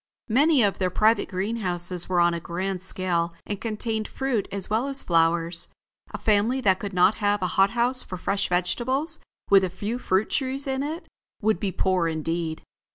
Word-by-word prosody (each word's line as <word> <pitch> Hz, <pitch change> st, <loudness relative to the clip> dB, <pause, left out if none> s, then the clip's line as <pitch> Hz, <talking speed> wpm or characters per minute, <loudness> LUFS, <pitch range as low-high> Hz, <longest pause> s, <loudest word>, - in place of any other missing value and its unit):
Many 280 Hz, +3 st, +4 dB
of 200 Hz, -2 st, +1 dB
their 185 Hz, -1 st, +1 dB
private 215 Hz, +4 st, +2 dB
greenhouses 185 Hz, -3 st, -1 dB
were 180 Hz, -1 st, +2 dB
on 175 Hz, 0 st, +4 dB
a 170 Hz, -, -2 dB
grand 180 Hz, +2 st, -3 dB
scale 175 Hz, -3 st, 0 dB
and 205 Hz, 0 st, -5 dB
contained 220 Hz, -1 st, -2 dB
fruit 265 Hz, -6 st, -2 dB
as 195 Hz, -2 st, -4 dB
well 225 Hz, +5 st, 0 dB
as 275 Hz, -1 st, 0 dB
flowers. 165 Hz, 0 st, +1 dB, 0.4 s
A -, -, -6 dB
family 220 Hz, +5 st, +2 dB
that 190 Hz, -5 st, +3 dB
could 205 Hz, -, -5 dB
not 180 Hz, +2 st, +4 dB
have 205 Hz, -1 st, +1 dB
a 180 Hz, -, -1 dB
hot 195 Hz, +1 st, +4 dB
house 250 Hz, +2 st, +2 dB
for 185 Hz, -, -6 dB
fresh 195 Hz, +2 st, -1 dB
vegetables, 260 Hz, -, -1 dB, 0.3 s
with 195 Hz, -1 st, +7 dB
a 185 Hz, -, 0 dB
few 205 Hz, +7 st, -4 dB
fruit 190 Hz, -2 st, 0 dB
trees 270 Hz, 0 st, -1 dB
in 265 Hz, -1 st, -1 dB
it, 310 Hz, +4 st, -4 dB, 0.4 s
would 215 Hz, -4 st, +2 dB
be 195 Hz, -1 st, -1 dB
poor 185 Hz, -2 st, +1 dB
indeed. 160 Hz, 0 st, -3 dB
195 Hz, 185 wpm, -25 LUFS, 180-230 Hz, 0.4 s, with